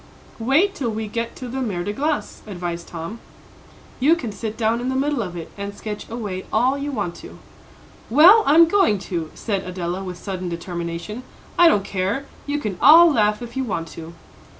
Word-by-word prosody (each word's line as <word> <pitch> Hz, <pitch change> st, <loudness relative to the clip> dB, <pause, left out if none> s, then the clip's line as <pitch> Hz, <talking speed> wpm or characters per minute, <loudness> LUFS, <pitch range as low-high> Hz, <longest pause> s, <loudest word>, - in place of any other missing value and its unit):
"Wait 290 Hz, -, +3 dB
till 255 Hz, -5 st, -3 dB
we 220 Hz, 0 st, -3 dB
get 230 Hz, +2 st, -4 dB
to 255 Hz, -, -7 dB
the 260 Hz, +2 st, -4 dB
Mer 195 Hz, -8 st, -2 dB
de 205 Hz, -, -3 dB
Glace," 295 Hz, +6 st, -2 dB
advised 175 Hz, -3 st, -5 dB
Tom. 170 Hz, +7 st, -7 dB, 0.8 s
"You 295 Hz, +6 st, +5 dB
can 245 Hz, -10 st, -5 dB
sit 220 Hz, +1 st, -6 dB
down 230 Hz, +1 st, +1 dB
in 250 Hz, -, -2 dB
the 260 Hz, -, -1 dB
middle 280 Hz, -1 st, 0 dB
of 180 Hz, -4 st, -5 dB
it, 165 Hz, -, -8 dB
and 200 Hz, 0 st, -5 dB
sketch 210 Hz, -1 st, -6 dB
away 205 Hz, -5 st, -5 dB
all 250 Hz, +5 st, +2 dB
you 285 Hz, +1 st, -4 dB
want 205 Hz, -9 st, -2 dB
to." -, -, -11 dB, 0.7 s
"Well, 340 Hz, -, +8 dB
I'm 325 Hz, +4 st, +7 dB
going 365 Hz, -, +3 dB, 0.2 s
to," 165 Hz, -2 st, -2 dB
said 200 Hz, -4 st, -2 dB
Adela, 180 Hz, +1 st, -4 dB
with 180 Hz, -2 st, -6 dB
sudden 185 Hz, -2 st, -5 dB
determination. 170 Hz, +5 st, -5 dB, 0.3 s
"I 345 Hz, -, +7 dB
don't 205 Hz, -12 st, +3 dB
care; 200 Hz, +8 st, -2 dB, 0.2 s
you 290 Hz, +1 st, -1 dB
can 210 Hz, -10 st, -4 dB
all 330 Hz, +2 st, +8 dB
laugh 210 Hz, -1 st, +1 dB
if 235 Hz, 0 st, -9 dB
you 265 Hz, -, -1 dB
want 170 Hz, -9 st, -3 dB
to." 165 Hz, +1 st, -10 dB
220 Hz, 195 wpm, -22 LUFS, 185-270 Hz, 0.8 s, Well